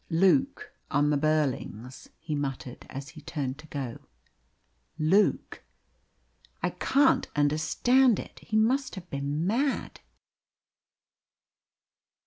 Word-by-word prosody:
"Luke 195 +11 +2 0.2
on 145 -1 +2
the - - +3
Burlings!" 140 -5 -1
he 155 - -5
muttered, 135 -3 -4
as 135 +1 -7
he 155 - -12
turned 140 -4 -4
to 155 - -13
go. 135 -6 -5 1.0
"Luke! 175 +7 +2 1.0
I - - +1
can't 275 0 +2
understand 160 - +3
it. - - -8
He 215 - -2
must 255 +4 +2
have 185 -2 -9
been 140 +3 -2
mad!" 260 +8 -1
155 Hz, 105 wpm, -28 LUFS, 140-215 Hz, 1.0 s, the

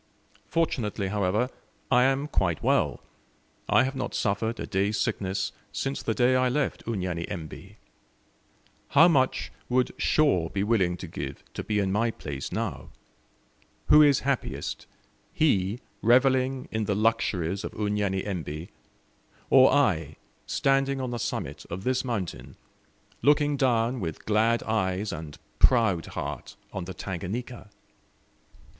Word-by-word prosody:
Fortunately, 110 -11 -1
however, 105 +5 0 0.4
I 125 0 +5
am 135 +2 +1
quite 90 - 0
well; - - +1 0.7
I - - +5
have 135 +1 -2
not 130 -2 -3
suffered 110 +3 -1
a - - -3
day's 100 +2 0
sickness 95 0 -1 0.2
since 135 0 -3
the 110 - -1
day 125 +1 +3
I 130 0 +3
left 145 +3 -1
Unyanyembe. 90 -6 -4 1.1
How 160 +5 +6
much 135 -6 +1 0.2
would 125 0 +2
Shaw 95 - +2
be 100 - -1
willing 95 -5 +1
to 90 - -7
give 70 -4 -6
to - - -5
be 105 - -1
in 100 -2 +1
my 115 +4 +2
place 70 -10 -6
now? - - -4 1.0
Who 150 - +8
is 145 -3 +5
happiest 135 -1 -3 0.5
he 105 -7 +2 0.2
revelling 130 +2 +3
in 110 -1 -1
the 100 - 0
luxuries 100 -4 0
of - - -5
Unyanyembe, 95 -6 -2 0.8
or 130 -1 +7
I, 80 - +2 0.3
standing 135 0 +1
on 130 -2 -3
the 120 - -3
summit - - -4
of 90 +3 -5
this 130 +2 0
mountain, 110 -9 -4 0.7
looking 145 0 +3
down 125 -2 +1
with 80 -6 -5
glad 110 +2 +2
eyes 100 -2 -1
and 75 -3 -7 0.2
proud 110 -10 +4
heart - - -6 0.2
on 95 - -4
the 95 0 -7
Tanganika? 105 +7 -5
110 Hz, 130 wpm, -27 LUFS, 95-130 Hz, 1.1 s, Who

